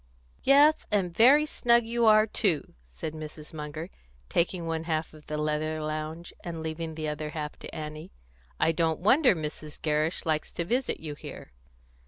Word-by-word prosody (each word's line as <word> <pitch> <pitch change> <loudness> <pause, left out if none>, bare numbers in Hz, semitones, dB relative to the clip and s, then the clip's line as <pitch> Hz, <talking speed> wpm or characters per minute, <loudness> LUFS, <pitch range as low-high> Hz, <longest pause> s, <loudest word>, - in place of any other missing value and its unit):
"Yes, 290 +3 +5
and 185 -5 0
very 275 +8 +7
snug 235 -5 +3
you 235 0 +1
are, 215 0 +7
too," 190 -7 0
said 65 - -6
Mrs. 155 0 -9
Munger, 155 +3 -6 0.4
taking 170 0 0
one 165 0 -2
half 160 -1 -2
of 155 -1 -16
the 150 - -3
leather 155 +1 -1
lounge, 155 +2 -4
and 165 -2 -5
leaving 160 0 -4
the 155 -1 -3
other 150 0 -3
half 150 -1 -5
to - - -9
Annie. 155 0 -7 0.5
"I 160 - +4
don't 165 -1 0
wonder 250 - +5
Mrs. 155 -1 -6
Gerrish 155 +3 0
likes 155 -1 -1
to 170 - -2
visit 250 +7 0
you 155 -2 -5
here." 145 - -10
160 Hz, 170 wpm, -28 LUFS, 155-195 Hz, 0.5 s, very